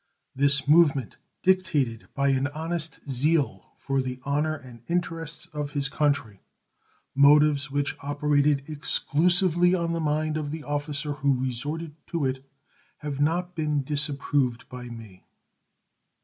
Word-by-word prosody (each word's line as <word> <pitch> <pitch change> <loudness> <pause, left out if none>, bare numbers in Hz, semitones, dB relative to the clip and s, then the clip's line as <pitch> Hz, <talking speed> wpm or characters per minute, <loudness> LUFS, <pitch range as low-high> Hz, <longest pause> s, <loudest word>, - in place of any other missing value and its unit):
This 140 0 +3
movement, 145 -6 +4 0.3
dictated 155 -12 +1
by 140 0 +2
an 135 +1 +2
honest 160 +1 -5
zeal 140 - 0
for 135 -1 -1
the 130 0 -5
honor 150 +2 0
and 125 -5 -12
interests 165 -2 -2
of 150 -1 -3
his 140 -1 +1
country 140 -9 0 0.7
motives 145 0 +5
which 140 +1 -1
operated 145 0 +1
exclusively 175 +4 +3
on 170 -2 -1
the 165 - -1
mind 155 0 0
of 150 -2 -3
the 155 +1 -5
officer 145 0 -3
who 140 -3 +1
resorted 145 +5 -4
to 165 -5 -1
it 130 0 -2 0.5
has 145 -2 -5
not 175 +4 0
been 150 -4 -1
disapproved 140 -4 -1
by 125 -1 -8
me. 115 -6 -11
145 Hz, 130 wpm, -26 LUFS, 135-155 Hz, 0.7 s, motives